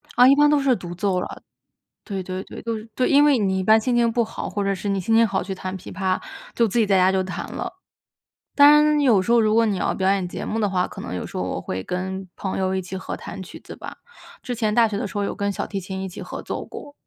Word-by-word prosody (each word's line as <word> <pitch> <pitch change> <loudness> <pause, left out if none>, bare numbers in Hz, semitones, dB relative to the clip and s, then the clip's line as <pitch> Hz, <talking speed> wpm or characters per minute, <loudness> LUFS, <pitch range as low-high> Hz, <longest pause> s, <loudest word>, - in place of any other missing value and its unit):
啊， 245 +1 +7
一 275 - +7
般 295 +1 +5
都 295 -1 +4
是 270 -2 +3
独 175 -5 -7
奏 185 0 0
了。 - - -6 0.6
对， 195 -3 -4
对， 185 +1 -5
对， - - -10
都 230 -1 -3
是 215 +1 -11
对， 255 - +1
因 285 +1 +6
为 290 -3 +5
你 190 -3 0
一 - - -1
般 220 +3 +6
心 245 +2 0
情 235 -1 +3
不 235 +1 +2
好， 225 - -6
或 205 - -2
者 195 0 +1
是 195 +2 -4
你 195 -1 0
心 225 +5 +1
情 230 0 +5
好 195 -2 -1
去 190 +1 -4
弹 185 0 -5
琵 - - -11
琶， 190 -1 -1 0.4
就 235 - +3
自 220 +3 0
己 225 - +4
在 195 -1 +4
家 185 +1 +4
就 190 0 +1
弹 185 - -6
了。 - - -4 0.8
当 285 0 +8
然 300 0 +5
有 235 -9 +4
时 210 - -1
候 235 - +6
如 215 -1 +3
果 230 0 +4
你 205 -3 0
要 - - 0
表 190 0 +1
演 195 -2 0
节 - - -6
目 225 - -2
的 210 -2 +1
话， 180 -1 0
可 - - -11
能 - - -6
有 90 - -4
时 - - -8
候 90 - -1
我 90 -1 -3
会 95 +1 -4
跟 190 - -4
朋 190 - -4
友 190 0 0
一 190 - -1
起 185 +1 -6
合 185 - -5
弹 195 - -8
曲 180 - -11
子 - - -11
吧， - - -9 0.4
之 245 - -4
前 215 -2 0
大 235 -1 +5
学 210 -2 -3
的 - - -2
时 205 - -7
候 205 - 0
有 - - -3
跟 200 0 -1
小 - - -4
提 200 - -4
琴 190 +1 -6
一 190 - -4
起 180 - -9
合 - - -7
作 - - -5
过。 290 - -10
200 Hz, 320 characters per minute, -23 LUFS, 190-230 Hz, 0.8 s, 当